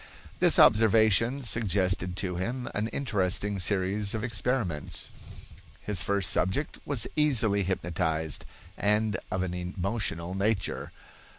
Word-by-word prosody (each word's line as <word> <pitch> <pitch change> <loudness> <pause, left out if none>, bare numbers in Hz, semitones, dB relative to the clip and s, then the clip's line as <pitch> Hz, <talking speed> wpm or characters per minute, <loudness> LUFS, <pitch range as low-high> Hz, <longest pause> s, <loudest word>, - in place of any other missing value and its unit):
This - - +5
observation 110 +4 +5
suggested 95 -5 0
to 90 -2 -2
him 120 +7 -3
an 105 +2 -1
interesting 105 -5 -1
series 100 +2 0
of 110 - -3
experiments. 115 - -2 0.7
His 100 -4 -2
first 100 0 0
subject 95 +11 -1
was 140 -6 +2
easily 120 -9 +2
hypnotized, 80 -4 -1 0.4
and 105 0 +2
of 95 0 -1
an 90 -1 -3
emotional 90 -1 -3
nature. 100 +1 -1
100 Hz, 110 wpm, -28 LUFS, 90-110 Hz, 0.7 s, This